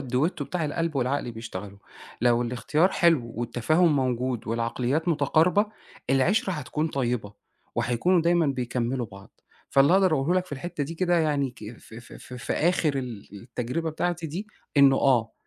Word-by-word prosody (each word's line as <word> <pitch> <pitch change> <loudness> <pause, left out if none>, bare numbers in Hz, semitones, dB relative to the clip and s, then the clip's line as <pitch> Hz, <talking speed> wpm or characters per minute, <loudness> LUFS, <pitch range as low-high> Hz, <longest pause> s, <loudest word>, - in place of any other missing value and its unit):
الDuetto 135 +5 -1
بتاع 170 +3 -3
القلب 160 +1 -2
والعقل 130 -1 -1
بيشتغلوا، 105 -3 -8 0.4
لو 120 0 +3
الاختيار 125 +8 +1
حلو 160 -12 +2
والتفاهم 135 +8 +2
موجود 125 -2 -1
والعقليات 120 +7 -1
متقاربة، 165 +6 +3 0.4
العِشرة 190 +10 +2
هتكون 155 0 -2
طيبة، 120 -7 -2 0.4
وهيكونوا 120 +10 +2
دايمًا 170 -1 +3
بيكملوا 125 -2 -2
بعض. 100 -2 -15 0.3
فاللي 140 +4 +5
أقدر 190 -3 +4
أقوله 155 +5 +1
لك 185 0 +1
في 180 - -11
الحتة 150 +1 -4
دي 165 - -6
كده 175 0 +2
يعني 145 -4 +1
ك 115 -1 -10
ف - - -15
ف 120 +2 -12
ف 125 - -11
في 125 - -4
آخر 155 -4 +1
ال 120 -6 -6
التجربة 125 +7 -3
بتاعتي 170 +1 -2
دي 175 +8 -5 0.3
إنه 140 -1 +6
آه، 120 -5 +2
135 Hz, 155 wpm, -26 LUFS, 120-165 Hz, 0.4 s, إنه